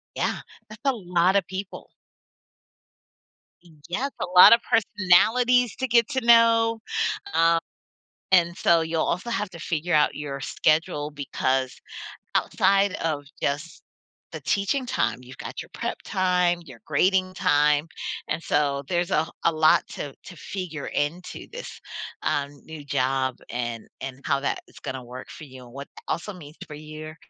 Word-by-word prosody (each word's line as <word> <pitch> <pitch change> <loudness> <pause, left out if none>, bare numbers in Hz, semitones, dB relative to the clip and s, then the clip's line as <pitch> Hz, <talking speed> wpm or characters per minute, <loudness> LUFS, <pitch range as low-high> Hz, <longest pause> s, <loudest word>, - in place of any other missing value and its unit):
Yeah, - - -1 0.3
that's 215 +1 -12
a 275 - +5
lot 180 -3 +1
of 195 - +3
people. 190 +1 -7 2.0
Yes, 265 +11 -2
a - - +1
lot 180 - +11
of 230 - +6
personalities 225 +4 +3
to 260 - -1
get 235 -2 +4
to 260 -2 -1
know. 230 -1 +5 0.6
Um 165 0 +4 0.8
and, 170 -1 +4
so, 170 -3 +4
you'll 160 0 0
also 180 +7 -2
have 220 -4 -2
to 170 - -10
figure 170 +1 -2
out 150 -1 +4
your 140 -2 -5
schedule 155 -1 +1
because 130 -2 -1 0.6
outside 200 0 +2
of 150 -3 -1 0.2
just 150 +4 -2 0.5
the - - -6
teaching 205 +7 0
time, - - 0
you've 125 0 -13
got - - -6
your - - -15
prep - - -3
time, 180 -2 +1
your 125 -6 -13
grading 185 +5 +2
time, 150 -1 +3 0.4
and 155 - -1
so, 140 -2 0
there's 175 -1 0
a 155 +1 +2 0.2
a 170 - +4
lot 155 0 +4
to 140 -2 -6
to 180 - -11
figure 165 -3 -6
into 160 +5 -3
this, - - -8 0.4
um, 140 0 0
new 160 -2 -9
job 130 -1 0 0.2
and 120 -2 -4
and 135 0 -6
how 140 - +1
that 140 - -1
is - - -15
going 130 - -5
to 130 - -6
work 125 +1 -9
for - - -10
you, 130 -2 -12
what 140 +3 -9 0.2
also 170 +5 -2
means 155 -4 -12
for 150 - -8
your 155 +1 -9
165 Hz, 155 wpm, -25 LUFS, 145-195 Hz, 2.0 s, lot